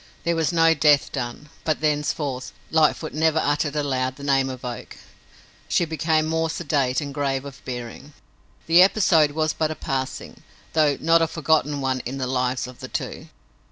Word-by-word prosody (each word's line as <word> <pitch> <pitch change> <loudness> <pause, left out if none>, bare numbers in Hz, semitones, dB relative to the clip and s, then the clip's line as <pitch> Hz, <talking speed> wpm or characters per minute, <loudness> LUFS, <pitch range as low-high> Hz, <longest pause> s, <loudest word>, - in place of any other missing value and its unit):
There 170 0 +1
was 165 0 +1
no 165 -1 +4
death 150 -3 +3
done, 130 +2 -5
but, 155 -2 0
thenceforth, 150 -3 -1 0.2
Lightfoot 155 0 +2
never 160 +1 +2
uttered 145 -1 0
aloud 130 -3 -1
the 140 - -11
name 135 -1 +2
of 130 -1 -7
Oak. 120 -1 -7 0.7
She 175 - +2
became 160 0 0
more 160 +1 0
sedate 140 -4 0
and 140 -1 -5
grave 135 -1 -1
of 140 -1 -10
bearing. 125 +3 -7 0.5
The 170 +2 +6
episode 180 -6 +4
was 155 0 0
but 155 -1 0
a 155 - -4
passing, 135 -3 -4 0.3
though 150 -3 +3
not 165 +1 +4
a 165 - +3
forgotten 150 -2 0
one 130 -1 0
in 130 +2 -5
the 130 - -2
lives 125 0 -1
of 125 -1 -11
the - - -7
two. - - -5
145 Hz, 175 wpm, -23 LUFS, 130-160 Hz, 0.7 s, The